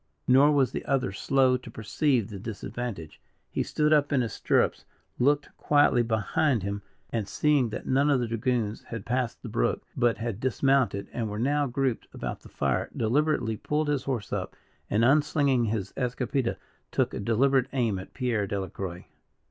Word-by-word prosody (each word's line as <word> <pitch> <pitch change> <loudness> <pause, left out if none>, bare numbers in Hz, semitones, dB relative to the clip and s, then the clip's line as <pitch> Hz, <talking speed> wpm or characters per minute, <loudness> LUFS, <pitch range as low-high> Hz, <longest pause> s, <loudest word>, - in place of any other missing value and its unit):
Nor 135 +4 +6
was 135 -4 +3
the - - -4
other 135 -8 0
slow 130 +5 +2
to 125 - -12
perceive 115 +1 0
the 100 - -6
disadvantage. 110 -4 -6 0.3
He - - -1
stood 150 0 +1
up 145 -1 +3
in 140 -3 +3
his 115 - -3
stirrups, - - +1 0.4
looked 145 +3 +1
quietly 145 -4 +4
behind 115 - +1
him, 100 +1 -3 0.3
and 110 -4 -2
seeing 145 -3 +2
that 110 - -6
none 140 +3 +2
of 140 -3 +3
the 120 - 0
dragoons 115 -1 -1
had 115 -3 -7
passed 125 -1 -2
the - - -5
brook, - - 0
but 120 -1 +2
had 115 -3 -4
dismounted 130 -5 +1
and 115 -3 -2
were 105 - -4
now 145 +5 +1
grouped 130 -1 -1
about - - -4
the - - -14
fire, - - -1
deliberately 120 -1 +1
pulled 150 +6 -1
his 140 -3 0
horse 120 -7 -3
up, - - -3 0.3
and, 110 +3 +3
unslinging 140 -2 +3
his 105 -3 -2
escopeta, 125 -1 -1 0.3
took - - 0
a - - -4
deliberate 125 +5 +2
aim 115 -8 0
at 95 - -11
Pierre 120 -6 0
Delacroix. 95 -2 -5
125 Hz, 170 wpm, -27 LUFS, 110-140 Hz, 0.4 s, Nor